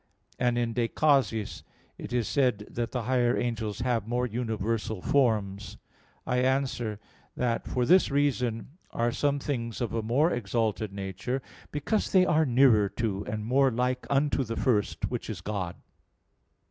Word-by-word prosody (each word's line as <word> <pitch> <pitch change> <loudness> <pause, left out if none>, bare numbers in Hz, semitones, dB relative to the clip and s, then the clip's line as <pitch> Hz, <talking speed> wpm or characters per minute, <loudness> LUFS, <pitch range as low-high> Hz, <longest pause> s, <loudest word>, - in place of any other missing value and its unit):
And 120 -1 +2
in 120 -1 0
De 120 0 +1
Causis 135 -8 +1 0.4
it - - -7
is 120 -3 0
said 125 -7 +1
that 120 -1 -3
the 125 -2 -2
higher 125 0 +2
angels 110 -3 -2
have 120 -4 0
more 120 +1 0
universal 110 -2 -2
forms. 105 -5 0 0.5
I 125 - 0
answer 130 -5 0 0.4
that, 120 -2 -1
For 125 -1 0
this 185 +7 +5
reason 135 0 -1
are 120 +1 0
some 145 +3 +1
things 120 -5 -3
of 120 -3 -2
a 115 - 0
more 135 +10 +2
exalted 110 -2 -1
nature, 100 +6 -3 0.3
because 150 +9 -1
they 185 -1 +5
are 160 -3 +3
nearer 120 -5 +5
to 100 -3 -2
and 105 0 -3
more 135 +3 +4
like 125 +1 -1
unto 140 0 +2
the 115 -1 -5
first, 110 -6 0
which - - -4
is - - -4
God. 95 -4 -3
120 Hz, 155 wpm, -28 LUFS, 110-130 Hz, 0.5 s, this